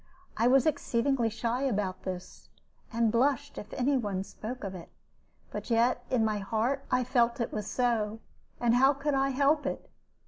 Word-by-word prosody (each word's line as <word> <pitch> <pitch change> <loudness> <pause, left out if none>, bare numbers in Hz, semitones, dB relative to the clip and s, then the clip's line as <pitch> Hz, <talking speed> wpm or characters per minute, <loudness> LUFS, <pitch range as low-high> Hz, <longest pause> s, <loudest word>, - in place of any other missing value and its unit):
I 230 - +2
was 260 0 +5
exceedingly 265 -4 +1
shy 230 +3 -2
about 205 -8 -1
this, 185 -1 -7 0.4
and 230 -2 +2
blushed 280 +4 +1
if 210 - -10
any 270 +2 +2
one 200 -6 -2
spoke 230 +5 -7
of 195 -1 -4
it; 175 -3 -9 0.6
but - - -6
yet 240 +1 +2
in 235 -4 +2
my 215 -1 0
heart 230 +7 -1
I 250 - +2
felt 240 -1 +2
it 235 - -2
was 210 -1 -3
so; 225 -3 0 0.4
and 235 -1 +3
how 265 +3 +5
could 285 +1 -2
I 270 0 +2
help 285 +3 +2
it? - - -5
240 Hz, 175 wpm, -29 LUFS, 220-270 Hz, 0.6 s, was